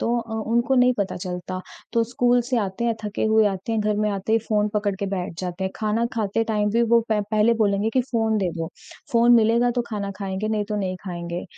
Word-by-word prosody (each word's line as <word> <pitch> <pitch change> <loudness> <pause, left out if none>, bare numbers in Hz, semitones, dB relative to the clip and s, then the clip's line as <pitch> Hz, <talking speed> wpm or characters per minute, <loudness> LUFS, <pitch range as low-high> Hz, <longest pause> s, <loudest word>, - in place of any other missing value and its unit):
तो 235 +1 +1
अ, 230 -1 -9 0.2
उनको 235 +3 +2
नहीं 250 0 +5
पता 200 -1 -1
चलता, 180 0 -5 0.3
तो 230 -1 +2
स्कूल 245 +1 +2
से 250 +1 -1
आते 200 +2 -2
हैं 230 -1 +1
थके 210 0 -2
हुए 220 0 +4
आते 195 +2 -2
हैं, 225 - +1
घर 210 0 0
में 210 0 +1
आते 200 +2 -2
ही 225 - +5
फ़ोन 210 -1 +2
पकड़ 205 -1 0
के 200 - -3
बैठ 190 -2 -3
जाते 180 0 -4
हैं, 190 - -1
खाना 220 +2 0
खाते 225 0 0
टाइम 210 -2 0
भी 230 +3 +2
वो 235 0 +4
प 215 -1 +3
पहले 215 +2 +4
बोलेंगे 205 -1 +1
कि 260 - +4
फ़ोन 225 -2 +1
दे 190 -3 0
दो। 165 -1 -2 0.5
फ़ोन 235 0 +5
मिलेगा 230 +2 +3
तो 245 - +1
खाना 205 -3 -3
खाएँगे 195 +1 -3
नहीं 215 -1 0
तो 210 - -2
नहीं 185 -2 -2
खाएँगे, 170 -2 -5
215 Hz, 240 wpm, -23 LUFS, 195-230 Hz, 0.5 s, नहीं